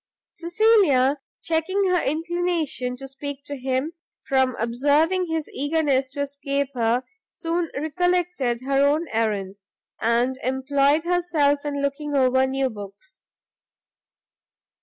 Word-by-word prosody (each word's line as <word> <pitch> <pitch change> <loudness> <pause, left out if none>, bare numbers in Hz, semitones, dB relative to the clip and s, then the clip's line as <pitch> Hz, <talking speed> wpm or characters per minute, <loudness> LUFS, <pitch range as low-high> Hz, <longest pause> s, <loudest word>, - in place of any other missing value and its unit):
Cecilia 340 - +3 0.2
checking 335 +5 0
her 360 - +3
inclination 325 -4 -1
to 270 +1 -8
speak 280 +1 -7
to 290 -1 -6
him, 265 +4 -2 0.3
from 265 -2 +2
observing 290 +10 +2
his 320 -2 -2
eagerness 285 -2 +1
to 275 +2 -5
escape 280 -1 -2
her, 240 0 +1 0.3
soon 335 0 -2
recollected 320 -5 0
her 275 +1 +2
own 300 +4 +2
errand, 205 -3 -1 0.4
and 240 +3 +1
employed 275 +4 +2
herself 335 -5 +1
in 285 -1 -2
looking 285 +1 -2
over 260 0 +3
new 265 -1 0
books. 205 - -11
280 Hz, 115 wpm, -23 LUFS, 260-325 Hz, 0.4 s, Cecilia